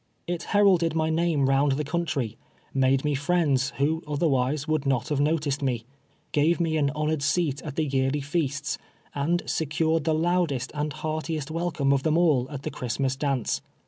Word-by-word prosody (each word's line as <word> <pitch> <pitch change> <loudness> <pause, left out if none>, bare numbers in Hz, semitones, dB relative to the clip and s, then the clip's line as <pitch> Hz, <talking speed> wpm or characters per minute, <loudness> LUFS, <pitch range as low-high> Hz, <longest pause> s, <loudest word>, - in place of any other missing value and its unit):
It 175 -1 -3 0.2
heralded 180 -6 +4
my 160 0 +1
name 160 -4 +2
round 135 +1 +3
the 150 +3 -1
country 145 -8 -2 0.2
— - - -34
made 130 +2 +2
me 150 - +1
friends, 140 -2 +1
who, 155 +4 +1
otherwise 145 -1 0
would 155 -2 0
not 130 +1 0
have 145 -2 0
noticed 145 -1 +1
me 125 -5 0 0.3
— 140 - -39
• - - -40
gave 155 +4 +2
me 165 -2 +1
an 145 -3 +2
honored 155 0 0
seat 150 -1 0
at 145 -3 -7
the 155 - +1
yearly 135 0 0
feasts, 145 -2 -2 0.3
and 165 +5 0
se 160 - -1
cured 160 +1 +1
the 160 -1 +2
loudest 165 -5 0
and 150 0 -2
heartiest 155 0 -3
welcome 160 -4 0
of 135 - +1
them 155 +3 +2
all 150 -8 +3
at 140 -2 -7
the - - -3
Christmas 130 +2 -2
dance. 135 -4 -1
150 Hz, 190 wpm, -26 LUFS, 135-160 Hz, 0.3 s, heralded